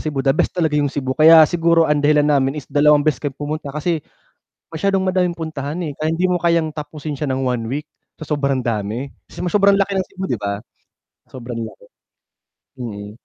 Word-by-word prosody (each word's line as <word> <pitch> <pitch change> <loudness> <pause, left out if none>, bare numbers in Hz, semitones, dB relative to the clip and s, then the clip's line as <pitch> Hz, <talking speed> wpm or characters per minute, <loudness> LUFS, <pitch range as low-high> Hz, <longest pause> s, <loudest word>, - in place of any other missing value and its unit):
Cebu 145 -3 -3
the 135 - +4
best 155 - -1
talaga, 160 -3 +1
yung 145 - +1
Cebu 130 -2 -3
kaya 160 +2 +8
siguro 165 +1 +3
ang 150 -1 +1
dahilan 150 0 +3
namin 140 -1 +2
is 145 - -6
2 145 0 +3
beses 155 -1 +1
kami 145 -2 -4
pumunta 150 0 -4
kasi, 155 +3 -2 0.7
masyadong 195 +4 0
madaming 185 -1 +1
puntahan 160 -2 -5
eh, - - -4
kaya 155 +1 -1
hindi 175 +3 +1
mo 180 - +1
kayang 170 -2 +1
tapusin 150 0 -6
siya 140 -1 -2
ng 130 - -1
1 125 -2 -1
week 150 +2 -4 0.3
sa 155 - -8
sobrang 140 -3 0
dami, 115 +2 -3 0.2
kasi - - -11
sobrang 200 +1 +4
laki 195 0 0
ng 190 -1 0
Cebu, 190 - -7
di 125 - 0
ba? 100 -1 -3 0.7
Sobrang 120 -2 -8
laki. 110 -3 -7 0.9
Mm. 105 -4 -6
150 Hz, 195 wpm, -19 LUFS, 135-165 Hz, 0.9 s, kaya